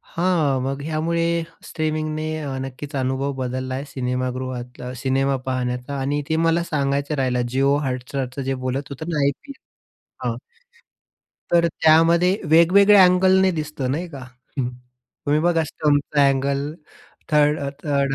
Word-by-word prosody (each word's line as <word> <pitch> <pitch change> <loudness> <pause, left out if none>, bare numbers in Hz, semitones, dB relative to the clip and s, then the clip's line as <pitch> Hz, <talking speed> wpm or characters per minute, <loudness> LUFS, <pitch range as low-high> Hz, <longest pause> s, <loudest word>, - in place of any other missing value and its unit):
हां, 160 -7 +1
मग 135 +1 -3
ह्यामुळे 165 +2 0 0.2
स्ट्रीमिंगने 155 0 -2 0.2
अ, 135 -2 -4
नक्कीच, 135 +2 -7
अनुभव 135 +1 -1
बदलला 130 0 -3
आहे, 140 +2 -4
सिनेमागृहातला, 125 -1 -4
सिनेमा 135 +1 +1
पाहण्याचा 125 +1 -2
आणि 145 +2 -1
ते 160 - +1
मला 170 +1 +2
सांगायचं 145 -1 -1
राहिलं. 125 -2 0
जिओ 135 +2 +2
हॉटस्टारचं 130 +1 -3
जे 135 0 -1
बोलत 135 +3 -2
होतं 155 +5 -6
ना 155 -3 -1
आयपीएल 260 - -3 0.6
हां. - - -1 1.2
तर 170 0 +5
त्यामध्ये 165 +4 +4
वेगवेगळ्या 190 +4 +7
अँगलने 190 +1 +4
दिसतं 150 -4 -4
नाही 170 +4 -3
का. 140 -4 -9 0.4
हं. 125 -2 0 0.6
तुम्ही 150 +1 +3
बघा 165 -1 +2
स्टंपचा 145 -1 +2
अँगल 140 +2 -1 0.6
3rd 150 0 +4
अ, 140 0 -2
3rd 140 -2 +1
140 Hz, 130 wpm, -22 LUFS, 130-160 Hz, 1.2 s, वेगवेगळ्या